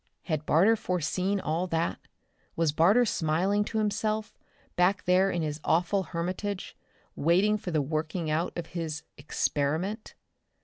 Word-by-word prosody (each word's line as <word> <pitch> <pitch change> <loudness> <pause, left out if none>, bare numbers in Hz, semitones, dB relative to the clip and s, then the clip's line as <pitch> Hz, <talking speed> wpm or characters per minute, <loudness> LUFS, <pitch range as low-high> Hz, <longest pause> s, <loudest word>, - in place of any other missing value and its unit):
Had 155 -3 -3
Barter 195 +9 +5
foreseen 185 +1 -1
all 170 +1 -1
that? 165 -1 -1 0.6
Was 165 -2 +2
Barter 190 +11 +4
smiling 185 +3 +1
to 220 - -4
himself, 215 0 -1 0.4
back 185 +3 +2
there 185 +2 +4
in 175 -3 -1
his 150 0 -3
awful 180 +4 +2
hermitage, 185 +3 -4 0.4
waiting 185 +7 +3
for 200 -3 -5
the 155 -4 +1
working 155 +3 -2
out 155 +3 0
of 170 - -3
his 160 -3 -4
"experiment"? 155 - -2
175 Hz, 135 wpm, -28 LUFS, 160-200 Hz, 0.6 s, Barter